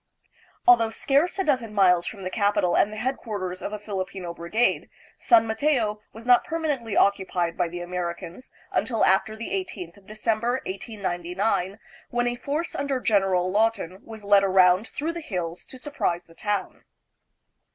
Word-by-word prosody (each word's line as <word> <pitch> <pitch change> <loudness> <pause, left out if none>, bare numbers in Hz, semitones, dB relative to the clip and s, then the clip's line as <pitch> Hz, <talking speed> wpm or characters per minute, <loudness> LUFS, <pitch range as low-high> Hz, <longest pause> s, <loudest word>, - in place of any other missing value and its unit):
Although 235 -2 +6
scarce 280 - +1
a 385 - +1
dozen 250 - 0
miles 180 -3 +4
from 200 -3 -6
the 185 - -4
capital 205 -4 +2
and 205 - +3
the 215 - -7
headquar 240 -2 -3
ters 180 +1 -7
of - - -4
a 210 - -3
Filipino 190 -4 -5
brigade, 170 +8 0 0.3
San 230 -2 +5
Mateo 220 -2 0
was 225 +1 -12
not 245 -1 +6
permanently 295 - -2
occupied 185 -4 +2
by 180 -2 0
the 175 +1 -6
Americans 175 +4 -5 0.2
until 230 -3 +1
after 195 +3 +2
the 230 +10 -6
18th 205 - -4
of 200 -1 -20
Decem 215 +1 -1
ber, 240 +2 0
1899, 190 -1 -2 0.3
when 240 0 0
a 245 0 0
force 295 +7 -3
under 280 -2 -1
General 190 -5 +2
Lawton 205 -4 0
was 220 -2 -10
led 200 -1 +5
around 185 +2 +4
through 320 +4 -3
the 340 - -5
hills 180 - -4
to 260 - -11
surprise 215 - -2
the 165 - -18
town. 205 +2 -3
210 Hz, 165 wpm, -25 LUFS, 185-240 Hz, 0.3 s, Although